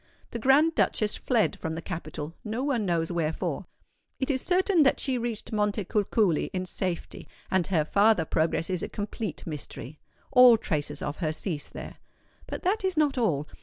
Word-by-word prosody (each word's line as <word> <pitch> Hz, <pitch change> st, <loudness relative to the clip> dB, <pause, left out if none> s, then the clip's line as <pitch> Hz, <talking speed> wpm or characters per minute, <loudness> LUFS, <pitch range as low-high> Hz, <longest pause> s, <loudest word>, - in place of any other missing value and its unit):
The 235 Hz, -, -4 dB
Grand 280 Hz, +7 st, +4 dB
Duchess 215 Hz, -7 st, +1 dB
fled 220 Hz, -5 st, +1 dB
from 160 Hz, 0 st, -3 dB
the 165 Hz, -, -5 dB
capital—no 170 Hz, -, -5 dB
one 245 Hz, -8 st, 0 dB
knows 170 Hz, -1 st, 0 dB
wherefore. 160 Hz, -2 st, -2 dB, 0.5 s
It 265 Hz, +2 st, 0 dB
is 260 Hz, -2 st, 0 dB
certain 370 Hz, -1 st, +3 dB
that 275 Hz, -, +4 dB
she 260 Hz, -3 st, -1 dB
reached 230 Hz, -2 st, -4 dB
Montecuculi 210 Hz, -3 st, +1 dB
in 185 Hz, -1 st, -2 dB
safety; 180 Hz, -1 st, -3 dB, 0.2 s
and 185 Hz, -2 st, +2 dB
her 160 Hz, -6 st, +1 dB
farther 200 Hz, -1 st, +3 dB
progress 165 Hz, +3 st, 0 dB
is 180 Hz, -2 st, -1 dB
a -, -, -4 dB
complete 205 Hz, -3 st, -5 dB
mystery. 150 Hz, -2 st, -7 dB, 0.3 s
All 250 Hz, -3 st, +8 dB
traces 155 Hz, -9 st, -2 dB
of 145 Hz, -, -3 dB
her 160 Hz, -4 st, -1 dB
cease 155 Hz, -2 st, -4 dB
there. -, -, -9 dB, 0.5 s
But -, -, -6 dB
that 395 Hz, +3 st, +1 dB
is 375 Hz, -3 st, 0 dB
not 290 Hz, -4 st, +2 dB
all. 150 Hz, -, +1 dB
205 Hz, 165 wpm, -27 LUFS, 165-250 Hz, 0.5 s, All